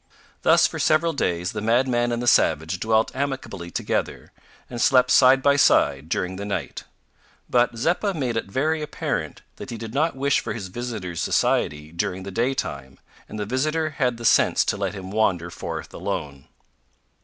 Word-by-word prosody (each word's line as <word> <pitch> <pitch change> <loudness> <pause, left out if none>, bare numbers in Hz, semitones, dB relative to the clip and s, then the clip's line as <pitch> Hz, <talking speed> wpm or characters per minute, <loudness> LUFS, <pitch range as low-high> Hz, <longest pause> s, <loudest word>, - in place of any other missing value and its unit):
Thus, - - +5
for - - -2
several 160 +2 +2
days, 90 - -1
the - - -5
madman 120 +1 +1
and 120 0 -2
the - - -3
savage 80 -4 +2
dwelt 110 +4 +1
amicably 130 -10 -4
together, - - -3 0.4
and 120 -1 -5
slept 125 0 +4
side 130 0 +6
by 140 0 +4
side 80 - +3
during 90 +2 -2
the 100 - -5
night; 100 0 -4 0.6
but 120 -1 +2
Zeppa 175 - 0
made 130 -6 -2
it 115 - -2
very 155 +9 0
apparent 150 - -4
that - - -8
he 120 - -5
did 110 0 -7
not 155 +3 +1
wish 140 +1 +1
for - - -4
his 100 -6 -6
visitor's 105 -6 -5
society 75 +1 0
during 90 +2 -3
the 100 - -7
day 120 +7 0
time, 70 - -5 0.3
and - - -7
the 105 - -3
visitor 155 +7 -1
had 125 -4 -1
the 120 - -7
sense - - +4
to - - 0
let 100 0 -3
him 95 -1 -8
wander 90 -5 0
forth - - -6
alone. 70 -2 -5
115 Hz, 180 wpm, -23 LUFS, 95-135 Hz, 0.6 s, side